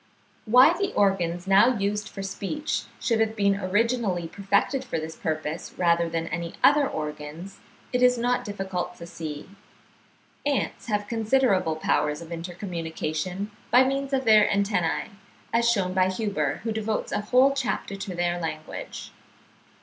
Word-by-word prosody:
Why 255 +9 +7
the 395 +2 -1
organs 180 -3 +1
now 205 +6 +5
used 205 +1 -1
for 195 - -7
speech 250 +10 -3
should 230 -2 +1
have 220 0 +1
been 200 -2 +2
originally 205 -2 0
perfected 200 +8 0
for 245 - -3
this 160 0 -5
purpose, 155 0 -4
rather 170 -1 +2
than 165 0 -2
any 170 +1 -4
other 290 -2 +6
organs, 150 +4 -6 0.3
it 250 - +1
is 250 0 +5
not 245 +1 +1
difficult 195 -3 -4
to 170 - -9
see. 155 -3 -7 1.0
Ants 285 -3 -1
have 205 -2 -1
considerable 220 -7 +2
powers 150 -1 0
of 170 0 -10
intercommunication 170 +1 -4 0.2
by 250 +3 +6
means 275 +1 -1
of 265 -1 0
their 215 -2 +6
antennae, 200 -2 0 0.4
as 235 0 +3
shewn 190 -6 +1
by 185 0 +3
Huber, 205 +1 -1
who 225 - -2
devotes 220 0 -2
a - - 0
whole 255 +6 +4
chapter 250 -6 -2
to 195 -2 -6
their 175 0 0
language. 155 -2 -6
200 Hz, 150 wpm, -26 LUFS, 170-230 Hz, 1.0 s, Why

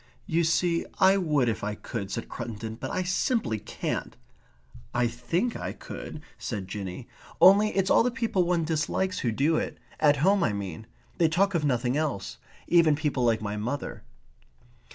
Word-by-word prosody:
"You 165 +1 +1
see, 170 +1 +2
I 190 +1 +5
would 150 -9 +2
if 110 -2 -1
I 105 0 -2
could," 105 -2 -5
said 115 - -4
Cruttendon, 110 0 -6
"but 130 - -4
I 185 - -1
simply 180 - 0
can't." - - -4 0.8
"I 125 0 +3
THINK 145 - -1
I - - -4
could," 155 - -8 0.2
said 100 -5 -4
Jinny. 100 +3 -6 0.3
"Only, 200 +3 +7
it's 195 0 +2
all - - +6
the 240 - +2
people 230 -6 0
one 175 -1 +1
dislikes 165 +4 -1
who 120 - 0
do 145 +8 +2
it. - - -3 0.2
At 145 -2 +4
home, 200 0 +4
I 105 - +1
mean. 100 +1 -5 0.3
They 165 -2 +4
talk 195 +5 +2
of 165 -4 +1
nothing 125 -1 +1
else. 100 - -2 0.3
Even 165 -3 +5
people 145 -4 -1
like 115 -2 +2
my 105 0 -3
mother." 125 +7 -4
145 Hz, 175 wpm, -27 LUFS, 115-175 Hz, 0.8 s, Only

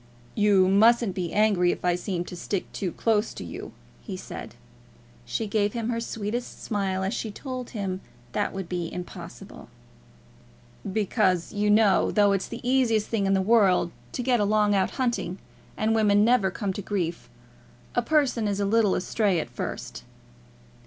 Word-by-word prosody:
"You 205 -3 +4
mustn't 220 +2 +4
be 180 -3 -3
angry 205 -4 +3
if - - -5
I 180 - +3
seem 175 0 -3
to 180 - -8
stick 185 +2 -3
too 185 -4 -3
close 220 +2 0
to - - -6
you," 85 - -7 0.3
he - - -6
said. - - -8 0.7
She 120 - -2
gave 205 0 0
him 230 -1 -2
her 230 -1 -1
sweetest 230 +1 -4
smile 195 -3 -1
as 195 +3 -1
she 225 - -3
told 255 +3 -6
him 195 -4 -4 0.3
that 205 - 0
that - - -5
would 190 -2 -5
be 175 -2 -3
impossible. 180 - -9 1.2
"Because, 190 -4 +1
you 210 0 +1
know, 210 -1 +4
though 205 -1 +4
it's 195 -1 0
the 235 +1 -7
easiest 240 -5 +2
thing 205 -4 0
in 195 - +3
the 190 - +1
world 195 -5 +4 0.2
to 250 - -2
get 245 -1 +2
along 210 0 +3
out 190 -1 +2
hunting, 235 -8 -1 0.4
and 220 +1 +1
women 210 -2 +4
never 235 -5 +3
come 195 0 -3
to 205 - -5
grief, 175 - -3 0.6
a 240 - +2
person 250 -5 +1
is 200 -1 -1
a 200 - +1
little 210 -1 +3
astray 195 -1 +1
at - - -5
first." - - -6
205 Hz, 175 wpm, -26 LUFS, 190-225 Hz, 1.2 s, You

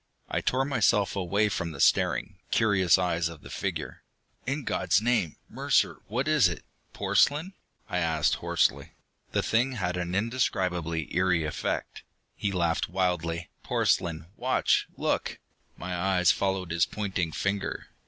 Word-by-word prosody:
I - - -1
tore 130 +1 +1
myself 115 -7 +2
away 100 +3 +1
from 85 -5 -3
the 70 - -10
staring, - - +2
curious 95 -5 +4
eyes 85 -2 0
of 80 -3 -11
the - - -11
figure. - - -4 0.5
"In 140 +2 -1
God's - - +2
name, 110 -8 +1
Mercer, - - +1
what 125 +7 -1
is 150 -11 +5
it? 85 - -7 0.3
Porcelain?" 155 +7 +2 0.3
I 90 - -1
asked 80 -3 +1
hoarsely. - - +1 0.4
The - - 0
thing 125 +4 +1
had 90 -6 -2
an 90 0 -3
indescribably 90 -7 -1
eery 90 -2 +2
effect. 75 - -3 0.3
He 100 - -2
laughed 85 -3 0
wildly. 90 -2 -1
"Porcelain? 80 -2 0
Watch... - - +2
look!" - - -1 0.4
My 90 0 -4
eyes 90 0 +3
followed 95 -3 -1
his 85 -1 +2
pointing 95 -6 -2
finger. 100 +4 -2
95 Hz, 140 wpm, -28 LUFS, 85-105 Hz, 0.5 s, is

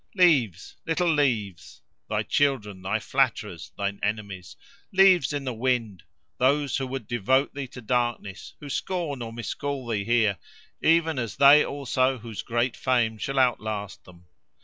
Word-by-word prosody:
+ - - -32
Leaves! 135 - +2
little 165 0 +1
leaves!—thy 115 - -2
children, 110 -10 0
thy 95 - -1
flatterers, - - -1
thine 100 0 -3
enemies! 100 -3 -4 0.4
Leaves 190 -7 +5
in 145 -1 -3
the 130 -2 -3
wind, 115 -6 -1 0.4
those 140 +1 +2
who 135 -1 -3
would 130 -3 -5
devote 125 +4 +1
thee 140 -1 -5
to 125 0 -11
darkness, 120 -4 -2
who 145 - -9
scorn 150 -2 -3
or 115 -1 -5
miscall 130 +3 -4
thee 110 -4 -2
here, 110 -5 +2 0.4
even 165 -3 +3
as 115 -3 -4
they 140 +2 +7
also 135 -1 0
whose 115 -2 -7
great 120 +1 -1
fame 120 -4 +1
shall 135 +4 -3
outlast 110 -5 -1
them. 90 -1 -17
125 Hz, 150 wpm, -25 LUFS, 110-140 Hz, 0.4 s, they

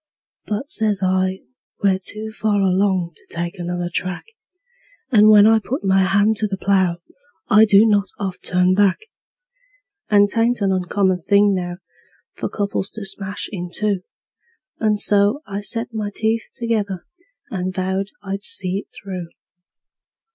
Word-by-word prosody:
"But," 215 +6 -3
says 210 -3 0
I, 185 0 0 0.4
"we're 190 -2 +3
too 215 +3 -5
far 215 -1 0
along 190 -2 +1
to - - -15
take 170 +1 -4
another 175 0 -3
track, 185 +1 -2 0.9
And 215 -3 +6
when 210 -1 +8
I 220 0 +5
put 260 +6 -4
my 190 0 +3
hand 205 +3 +2
to 215 - +1
the 195 -1 -4
plow 190 -3 +1 0.5
I 215 -1 +7
do 205 0 +6
not 205 -2 +2
oft 190 -3 -5
turn 180 0 +2
back; 195 -1 +3 1.1
And 205 -1 +5
'tain't 230 +3 +1
an 195 -1 +2
uncommon 185 0 0
thing 200 0 +5
now 175 -1 -3 0.6
for - - -4
couples 200 -2 -2
to 215 -2 -6
smash 195 +1 -4
in 180 -4 -5
two;" 205 +1 0 0.8
And 210 -2 +1
so 205 +9 +3
I 200 -1 -5
set 230 +3 0
my 215 -2 -3
teeth 220 +2 -2
together, 215 -6 -2 0.5
and 185 -2 -2
vowed 190 +1 -2 0.2
I'd 195 0 -5
see 190 -4 +2
it - - -11 0.2
through. 185 -3 -6
200 Hz, 150 wpm, -20 LUFS, 185-210 Hz, 1.1 s, when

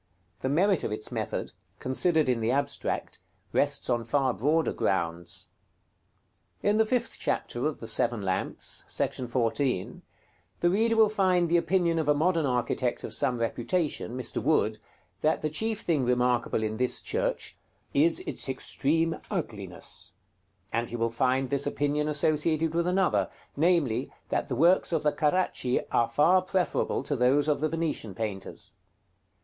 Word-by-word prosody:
The 130 - -2
merit 185 +5 +2
of - - -2
its 110 0 -4
method, - - -3 0.3
considered 155 +4 +2
in 125 -2 +1
the 110 0 0
abstract, 140 +3 -2 0.3
rests - - +1
on 120 -1 +1
far 130 +2 +1
broader 155 +7 +1
grounds. 85 -2 -2 1.2
In 205 +1 +3
the 220 0 +3
fifth 240 0 -1
chapter 120 +5 -1
of 155 - -3
the 115 - -7
"Seven 115 -1 +1
Lamps," 95 -1 -3
§ 125 -2 -1
14, 120 -3 -1 0.6
the 175 - +3
reader 225 +4 +2
will 220 -1 +6
find 185 -4 +2
the 170 - +4
opinion 170 -1 +1
of 155 - -1
a 150 - +4
modern 165 0 +2
architect 125 0 -1
of - - -3
some 125 -2 +1
reputation, 120 +3 -1
Mr. 130 - -3
Wood, 110 -7 +2 0.4
that 155 0 +1
the 155 - -1
chief 220 +6 -1
thing 155 -6 +1
remarkable 125 -2 +1
in 110 0 -2
this 125 0 +1
church - - -2 0.4
"is 160 +4 +4
its - - -3
extreme 160 +5 0
ugliness;" 105 - -6 0.6
and 115 0 -1
he - - -5
will 115 -1 0
find 130 +2 +1
this 140 0 0
opinion 145 +1 0
associated 155 +2 +1
with 170 +1 +1
another, 185 0 +2 0.3
namely, 145 -7 +1 0.2
that - - -1
the 125 - -2
works 170 +9 +4
of 160 -3 0
the 150 - +3
Caracci 150 -6 +1
are 115 - +3
far 180 +5 +4
preferable 185 0 0
to 145 - -2
those 135 +4 +3
of 150 - +2
the 155 - +1
Venetian 160 - -2
painters. 100 -3 -5
145 Hz, 155 wpm, -28 LUFS, 120-170 Hz, 1.2 s, will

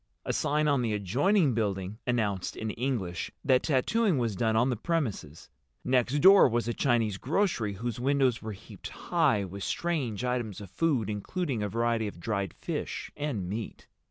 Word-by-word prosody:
A - - -1
sign 150 +1 +1
on 140 -3 +3
the 115 -3 0
adjoining 140 - +2
building 100 -2 -2
announced—in 110 -2 -1
English—that 125 +2 -1
tattooing 170 - +2
was 115 -5 0
done 110 +3 +1
on 120 +4 +3
the - - 0
premises, 110 - -3 0.4
next 125 +2 +2
door 195 -4 +8
was 120 0 0
a 120 - 0
Chinese 115 -7 +1
grocery 140 - 0
whose 115 +4 -4
windows 130 -2 +2
were 110 -1 -5
heaped 95 - -10
high 100 -1 +1
with 95 +1 -7
strange 135 - -2
items 120 -5 -2
of 100 -3 -10
food 130 - +1
including 120 - -2
a 105 - -1
variety 115 0 0
of 100 - -8
dried 100 -1 -2
fish - - -4
and 140 -11 -3
meat. 105 +4 -5
115 Hz, 160 wpm, -29 LUFS, 105-135 Hz, 0.4 s, door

